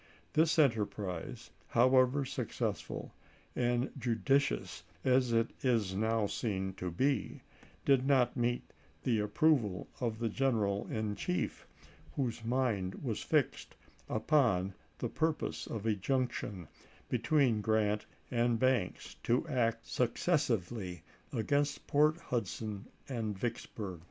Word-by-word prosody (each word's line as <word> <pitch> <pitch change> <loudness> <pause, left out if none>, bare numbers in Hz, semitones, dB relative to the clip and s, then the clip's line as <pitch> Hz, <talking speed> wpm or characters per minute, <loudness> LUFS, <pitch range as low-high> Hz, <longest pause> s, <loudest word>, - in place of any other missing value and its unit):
This 160 +1 +3
enterprise, 105 - 0 0.2
however 130 +3 +4
successful - - -3 0.4
and 120 +1 +1
judi 125 +3 +3
cious - - -3 0.2
as 130 -1 +4
it 115 0 +2
is 115 -7 +2
now 110 +2 +1
seen 95 -3 -2
to 90 - -3
be, 135 +11 0 0.4
did 135 -1 +4
not 130 -4 +4
meet 120 -1 0 0.4
the 115 -4 +2
approval 105 - +2
of 115 -3 -1
the 115 0 -1
general 110 -5 +1
in 110 -2 -2
chief, 90 -2 -2 0.5
whose 120 -5 -2
mind 115 -6 0
was - - -2
fixed - - 0 0.3
upon 110 - +2 0.2
the - - -2
purpose 160 0 -1
of 110 -2 -5
a 110 - +3
junction 105 - -2 0.4
between 125 -2 +2
Grant 105 -1 +1 0.2
and 120 -1 +2
Banks, 125 -6 0
to 125 +7 +1
act 115 -5 0
successively 115 - 0 0.3
against 140 +6 0
Port 150 +2 +4
Hudson 110 - -3 0.2
and 110 -6 -3
Vicksburg. 100 -4 -4
115 Hz, 115 wpm, -33 LUFS, 105-130 Hz, 0.5 s, however